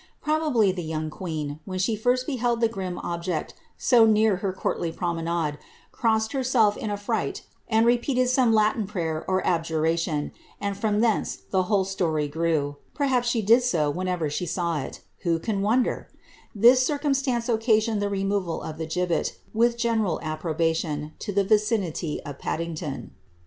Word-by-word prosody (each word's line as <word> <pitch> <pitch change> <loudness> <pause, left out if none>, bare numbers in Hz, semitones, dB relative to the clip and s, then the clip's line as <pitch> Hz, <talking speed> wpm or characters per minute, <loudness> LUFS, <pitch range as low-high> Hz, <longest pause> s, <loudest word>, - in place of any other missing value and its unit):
Probably 300 -10 +2
the 180 -1 -4
young 155 -1 -3
queen, 155 -4 -4
when 185 -1 -5
she 195 +4 +1
first 250 +4 +1
beheld 245 -4 0
the 230 - +4
grim 190 -5 -5
object 170 -2 -3 0.2
so 240 -3 +5
near 215 -2 +4
her 195 0 -2
courtly 175 -2 -2
promenade, 165 -3 -2 0.3
crossed 220 -1 +1
herself 250 -6 +2
in 220 - -4
a 205 - -2
fright, 205 - -2 0.3
and 225 0 +4
repeated 250 +2 +2
some 250 -2 +3
Latin 215 -1 +2
prayer 165 -6 -3
or 185 0 0
adjuration, 165 -2 0 0.3
and 200 -1 -2
from 210 +1 0
thence 230 -2 +1 0.2
the 185 -1 +2
whole 200 -3 +3
story 165 -6 -1
grew; 150 -2 -1 0.2
perhaps 260 -4 +1
she 235 -2 +1
did 230 +5 +6
so 165 -12 +1
whenever 180 -1 -1
she 150 +5 -3
saw 170 -2 -1
it - - -8
— - - -42
who 170 -2 +1
can 200 +4 -2
won 230 +5 +3
der - - -4 0.3
} - - -28
This 255 +1 +8
circumstance 275 -4 0
occasioned 220 -2 +2
the 205 - 0
removal 195 -3 -1
of 160 0 -7
the 160 - -3
gibbet, 175 +1 -1 0.2
with 235 +1 +2
general 225 -7 +1
approbation, 155 -1 -1
to 210 - -4
the 200 0 +2
vicinity 205 -6 0
of 145 -1 -7
Paddington.' 160 -3 -4
195 Hz, 165 wpm, -25 LUFS, 165-230 Hz, 0.3 s, This